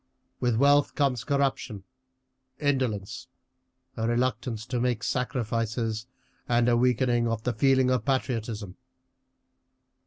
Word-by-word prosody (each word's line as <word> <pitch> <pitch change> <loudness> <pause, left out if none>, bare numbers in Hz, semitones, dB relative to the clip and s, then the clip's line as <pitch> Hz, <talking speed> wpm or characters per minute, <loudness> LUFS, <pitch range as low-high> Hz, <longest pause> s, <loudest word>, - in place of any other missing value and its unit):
With 120 -2 +1
wealth 145 +3 +4
comes 135 -6 +1
corruption, 135 -8 -1 0.8
indolence, 130 -9 -1 0.7
a 115 0 -1
reluctance 120 -2 -1
to 125 -1 -2
make 120 -3 0
sacrifices, 115 -2 -2 0.4
and 120 0 +3
a 120 - +4
weakening 120 -1 +2
of 115 -1 -2
the 125 - 0
feeling 130 +2 +3
of 125 -4 +1
patriotism. 115 -7 -2
120 Hz, 105 wpm, -27 LUFS, 115-130 Hz, 0.8 s, wealth